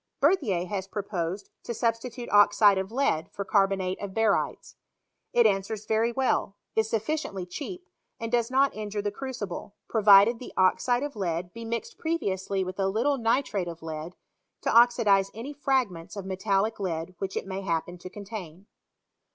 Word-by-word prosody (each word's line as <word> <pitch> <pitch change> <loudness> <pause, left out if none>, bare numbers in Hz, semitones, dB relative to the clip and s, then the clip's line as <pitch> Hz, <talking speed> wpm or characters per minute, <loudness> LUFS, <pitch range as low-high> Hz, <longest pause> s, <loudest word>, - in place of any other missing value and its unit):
Berthier 270 - +2
has 190 0 -4
proposed 195 -2 -4
to 235 - -5
sub 230 0 +2
stitute 240 +1 -8
oxide 205 -1 +6
of 190 +2 -4
lead 225 - 0
for 200 - -5
carbonate 195 -2 +1
of 200 -2 -6
barytes. 225 -2 0 0.6
It 240 - +4
answers 205 +1 0
very 220 +2 +2
well, 245 -5 0 0.2
is 220 0 +2
sufficiently 225 - -2
cheap, 355 - -7 0.3
and 230 0 -4
does 235 -2 +2
sot 270 +2 +3
injure 210 -1 -4
the 205 - -1
crucible, 210 -6 -6
provided 210 +1 +6
the 250 - -9
oxide 240 +7 +3
of 290 -1 -4
lead 175 -3 -2
be 230 0 -7
mixed 235 - -4
previously 195 - -1
with 185 +1 -6
a 195 - +2
little 250 +8 +1
nitrate 225 -5 +1
of 170 -1 -8
lead, 160 +2 -6 0.5
to - - 0
oxidize 225 -5 +5
any 245 +6 -6
fragments 255 -13 -1
of 200 -2 -6
metallic 195 +3 0
lead 170 -2 -3
which 190 -1 -3
it - - -3
may 190 0 -4
happen 175 -1 -2
to 185 - -8
contain. 195 -3 -8
205 Hz, 165 wpm, -27 LUFS, 190-235 Hz, 0.6 s, oxide